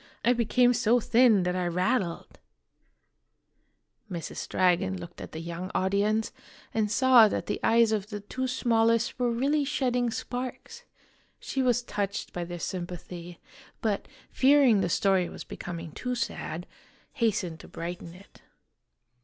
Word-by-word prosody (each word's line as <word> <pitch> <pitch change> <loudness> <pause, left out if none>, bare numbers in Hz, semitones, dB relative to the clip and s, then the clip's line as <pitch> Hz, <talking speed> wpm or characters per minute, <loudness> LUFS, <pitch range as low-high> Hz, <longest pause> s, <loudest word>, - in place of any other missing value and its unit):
I 245 - +5
became 245 +1 +3
so 235 +1 +3
thin 230 -4 +4
that 180 0 -1
I 180 -1 0
rattled! 180 +1 -1 0.8
" 210 - -35
Mrs. 170 -2 -5
Dragon 185 +1 +2
looked 170 0 -10
at - - -8
the 160 - -6
young 170 +2 -5
audience, 200 +4 +1 0.4
and 215 -2 +1
saw 250 0 +6
that - - -2
the - - -3
eyes 230 -1 +4
of 210 -2 -1
the 210 -2 -5
two 255 +6 -4
smallest 230 -2 +1
were 245 -1 +2
really 275 +6 +1
shedding 250 -4 0
sparks. 255 - -6 0.5
She 270 - -2
was 250 -1 +2
touched 200 -3 -3
by 175 -1 -3
their 175 0 -6
sympathy, 175 -1 -6 0.4
but, 210 -3 -1 0.2
fearing 265 -6 +5
the - - 0
story 190 -1 +2
was - - -8
becoming 170 -2 -7
too 250 - -3
sad, 175 -7 -4 0.5
hastened 205 - -1
to - - -12
brighten 170 0 -7
it. 195 +2 -17
210 Hz, 145 wpm, -28 LUFS, 180-245 Hz, 0.8 s, saw